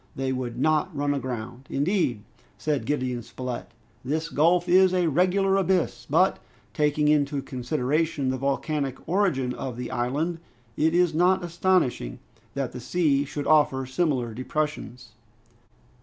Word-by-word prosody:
They 135 Hz, 0 st, -1 dB
would 125 Hz, -2 st, -4 dB
not 155 Hz, +3 st, +1 dB
run 145 Hz, 0 st, +1 dB
aground!" 125 Hz, -1 st, -5 dB
"Indeed," 145 Hz, -, 0 dB, 0.3 s
said 150 Hz, -3 st, -2 dB
Gideon 130 Hz, -4 st, -1 dB
Spilett, 125 Hz, +1 st, -6 dB, 0.3 s
"this 155 Hz, +5 st, -2 dB
gulf 175 Hz, +4 st, +3 dB
is 185 Hz, +1 st, +5 dB
a 180 Hz, -1 st, +2 dB
regular 185 Hz, +5 st, +2 dB
abyss, 185 Hz, -3 st, 0 dB
but, -, -, +3 dB, 0.3 s
taking 150 Hz, 0 st, +1 dB
into 145 Hz, -2 st, +2 dB
consideration 135 Hz, +3 st, -1 dB
the 130 Hz, -, -2 dB
volcanic 140 Hz, 0 st, -1 dB
origin 160 Hz, -9 st, +1 dB
of 130 Hz, -3 st, -5 dB
the 125 Hz, 0 st, -5 dB
island, 145 Hz, +8 st, -1 dB, 0.4 s
it 160 Hz, +2 st, +2 dB
is 175 Hz, -2 st, +3 dB
not 180 Hz, +3 st, +3 dB
astonishing 170 Hz, -, 0 dB, 0.4 s
that 135 Hz, -3 st, -2 dB
the -, -, -7 dB
sea 145 Hz, 0 st, +1 dB
should 145 Hz, +1 st, -5 dB
offer 145 Hz, -4 st, +3 dB
similar 130 Hz, -4 st, -1 dB
depressions." 130 Hz, -2 st, -4 dB
145 Hz, 135 wpm, -25 LUFS, 130-170 Hz, 0.4 s, is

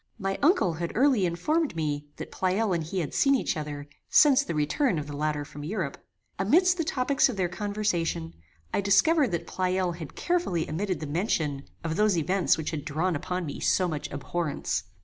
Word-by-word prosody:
My 195 Hz, -2 st, -2 dB
uncle 285 Hz, -, +3 dB
had 170 Hz, +1 st, -4 dB
early 250 Hz, -7 st, +4 dB
informed 290 Hz, -, 0 dB
me 145 Hz, -2 st, -2 dB
that -, -, -8 dB
Pleyel 190 Hz, +2 st, 0 dB
and 170 Hz, -2 st, 0 dB
he 180 Hz, +4 st, -2 dB
had 155 Hz, -, -5 dB
seen 275 Hz, 0 st, +4 dB
each 260 Hz, -, 0 dB
other, 150 Hz, -2 st, -5 dB, 0.2 s
since 285 Hz, -3 st, +6 dB
the 280 Hz, -, -4 dB
return 165 Hz, -, +1 dB
of 150 Hz, -, -3 dB
the 145 Hz, 0 st, -7 dB
latter 150 Hz, 0 st, -1 dB
from 145 Hz, 0 st, -9 dB
Europe. 170 Hz, -4 st, -4 dB, 0.4 s
Amidst 355 Hz, -, +4 dB
the -, -, +2 dB
topics 275 Hz, -3 st, +2 dB
of 235 Hz, -, -4 dB
their 185 Hz, -2 st, +1 dB
conversation, 180 Hz, -, -2 dB, 0.4 s
I -, -, +2 dB
discovered 265 Hz, -, +4 dB
that 170 Hz, -2 st, -3 dB
Pleyel 185 Hz, 0 st, 0 dB
had 160 Hz, -4 st, -8 dB
carefully 340 Hz, -, 0 dB
omitted 185 Hz, +4 st, -2 dB
the -, -, -3 dB
mention 150 Hz, -3 st, -1 dB, 0.2 s
of 165 Hz, 0 st, -2 dB
those 210 Hz, -3 st, +3 dB
events 180 Hz, +4 st, +2 dB
which 160 Hz, -, -3 dB
had 150 Hz, -3 st, -4 dB
drawn 160 Hz, +4 st, -1 dB
upon 180 Hz, +4 st, -3 dB
me 145 Hz, -, -6 dB
so 185 Hz, -, +2 dB
much 155 Hz, -4 st, -4 dB
abhorrence. 140 Hz, -, -2 dB
180 Hz, 190 wpm, -27 LUFS, 155-215 Hz, 0.4 s, since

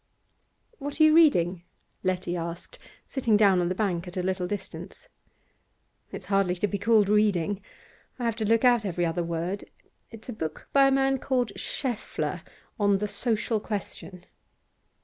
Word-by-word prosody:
'What 285 Hz, +2 st, -6 dB
are -, -, +7 dB
you 310 Hz, 0 st, +6 dB
reading?' 185 Hz, -, +4 dB, 0.4 s
Letty 185 Hz, -1 st, -1 dB
asked, 170 Hz, 0 st, -6 dB, 0.3 s
sitting 235 Hz, -6 st, +1 dB
down 195 Hz, -4 st, +4 dB
on 175 Hz, -, 0 dB
the 185 Hz, -, -1 dB
bank 180 Hz, -4 st, -1 dB
at 180 Hz, -, -8 dB
a 180 Hz, -, -1 dB
little 185 Hz, -1 st, -1 dB
distance. 205 Hz, -, -7 dB, 1.0 s
'It's -, -, -8 dB
hardly 195 Hz, -3 st, +1 dB
to 180 Hz, -, 0 dB
be 200 Hz, 0 st, -3 dB
called 215 Hz, -1 st, +4 dB
reading. 205 Hz, -2 st, +2 dB, 0.6 s
I 245 Hz, -, -3 dB
have 230 Hz, -2 st, 0 dB
to 220 Hz, -, -1 dB
look 230 Hz, +2 st, +3 dB
out 240 Hz, -3 st, +5 dB
every 175 Hz, -3 st, -1 dB
other 165 Hz, +1 st, -1 dB
word. 170 Hz, +4 st, -3 dB, 0.4 s
It's 225 Hz, -1 st, -12 dB
a 245 Hz, -, -5 dB
book 160 Hz, -7 st, -6 dB
by 275 Hz, -1 st, +6 dB
a -, -, +3 dB
man 270 Hz, 0 st, +2 dB
called 250 Hz, -5 st, 0 dB
Schaeffle, 250 Hz, -6 st, -3 dB, 0.4 s
on 200 Hz, -1 st, +3 dB
the 210 Hz, +2 st, -2 dB
"Social 220 Hz, +1 st, 0 dB
Question." 200 Hz, -3 st, -6 dB
205 Hz, 165 wpm, -27 LUFS, 180-235 Hz, 1.0 s, are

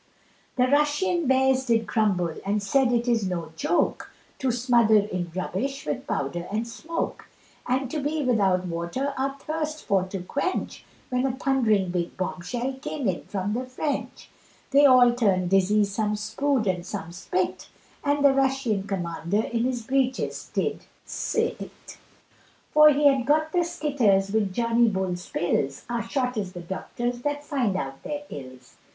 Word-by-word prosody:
The 250 Hz, -, +3 dB
Russian 300 Hz, +4 st, +2 dB
bears 265 Hz, 0 st, +3 dB
did 225 Hz, -1 st, +2 dB
grumble 185 Hz, -7 st, +1 dB
and 205 Hz, +1 st, -1 dB
said 255 Hz, +5 st, +2 dB
it 240 Hz, 0 st, +1 dB
is 225 Hz, -5 st, +1 dB
no 170 Hz, -3 st, -4 dB
joke 250 Hz, -, 0 dB, 0.3 s
To 265 Hz, -, 0 dB
smother 235 Hz, -2 st, +3 dB
in 185 Hz, -4 st, -1 dB
rubbish 250 Hz, +9 st, -3 dB
with 150 Hz, -, -3 dB
powder 170 Hz, +6 st, -2 dB
and 220 Hz, +3 st, -1 dB
smoke, 320 Hz, +8 st, -5 dB, 0.4 s
And 260 Hz, +2 st, +1 dB
to 310 Hz, -, -2 dB
be 295 Hz, +2 st, -1 dB
without 195 Hz, -7 st, +2 dB
water 170 Hz, +12 st, -3 dB
our 275 Hz, +1 st, -2 dB
thirst 310 Hz, 0 st, -4 dB
for 195 Hz, -2 st, +3 dB
to 190 Hz, -1 st, -6 dB
quench, 280 Hz, -, -3 dB, 0.3 s
When 250 Hz, +1 st, +1 dB
a 260 Hz, -, -1 dB
thundering 220 Hz, -9 st, +2 dB
big 175 Hz, -1 st, -3 dB
bomb 185 Hz, -1 st, -3 dB
shell 245 Hz, +8 st, -3 dB
came 285 Hz, -4 st, -3 dB
in 185 Hz, -2 st, -2 dB
from 200 Hz, +1 st, -2 dB
the 255 Hz, +3 st, -3 dB
French, 280 Hz, +3 st, -4 dB, 0.4 s
They 285 Hz, +1 st, +7 dB
all 250 Hz, -2 st, +6 dB
turned 190 Hz, -7 st, +1 dB
dizzy 200 Hz, +2 st, +4 dB
some 210 Hz, +1 st, -1 dB
spued 225 Hz, +4 st, 0 dB
and 180 Hz, -3 st, 0 dB
some 185 Hz, -2 st, -6 dB
spit, 185 Hz, +1 st, -2 dB, 0.3 s
And 285 Hz, 0 st, +2 dB
the 275 Hz, -, +7 dB
Russian 265 Hz, -7 st, 0 dB
commander 180 Hz, +2 st, -1 dB
in 235 Hz, 0 st, -1 dB
his 250 Hz, -2 st, -2 dB
breeches 260 Hz, +1 st, -1 dB
did -, -, -2 dB, 0.2 s
s -, -, -4 dB
t, -, -, -1 dB, 1.0 s
For 305 Hz, 0 st, +8 dB
he 295 Hz, 0 st, +2 dB
had 270 Hz, -3 st, +4 dB
got 310 Hz, +2 st, +2 dB
the 355 Hz, -, +2 dB
skitters 260 Hz, -, +1 dB
with 210 Hz, -3 st, +1 dB
Johnny 230 Hz, +2 st, +3 dB
Bull's 185 Hz, -3 st, -3 dB
pills, 140 Hz, -5 st, -1 dB
Our 235 Hz, -1 st, 0 dB
shot 250 Hz, +1 st, -2 dB
is 195 Hz, -3 st, -3 dB
the 175 Hz, -, -7 dB
doctors 240 Hz, +7 st, -4 dB
that 290 Hz, +1 st, -2 dB
find 260 Hz, -10 st, 0 dB
out 135 Hz, -6 st, -4 dB
their 295 Hz, 0 st, -5 dB
ills. 130 Hz, -2 st, -10 dB
235 Hz, 165 wpm, -25 LUFS, 190-270 Hz, 1.0 s, For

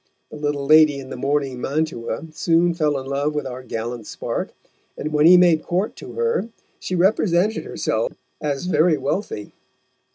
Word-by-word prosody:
The -, -, -8 dB
little 145 Hz, -1 st, -2 dB
lady 155 Hz, -1 st, +6 dB
in 135 Hz, 0 st, -9 dB
the -, -, -4 dB
mourning 135 Hz, -1 st, -1 dB
mantua 145 Hz, -4 st, -2 dB
soon 170 Hz, +2 st, +2 dB
fell 155 Hz, -4 st, 0 dB
in 130 Hz, -, -8 dB
love 140 Hz, +2 st, -1 dB
with 150 Hz, -, -2 dB
our 130 Hz, -1 st, -6 dB
gallant 115 Hz, -2 st, -5 dB
spark, -, -, -4 dB, 0.5 s
and 155 Hz, +1 st, -4 dB
when 150 Hz, +1 st, +5 dB
he 180 Hz, +1 st, +9 dB
made 175 Hz, -3 st, +5 dB
court 185 Hz, +6 st, -2 dB
to -, -, -9 dB
her, 465 Hz, -, 0 dB, 0.3 s
she 185 Hz, -, -3 dB
represented 190 Hz, +2 st, +2 dB
herself -, -, -1 dB, 0.3 s
as 145 Hz, +1 st, -2 dB
very 160 Hz, -2 st, +3 dB
wealthy. 135 Hz, -, -3 dB
150 Hz, 165 wpm, -22 LUFS, 140-175 Hz, 0.5 s, he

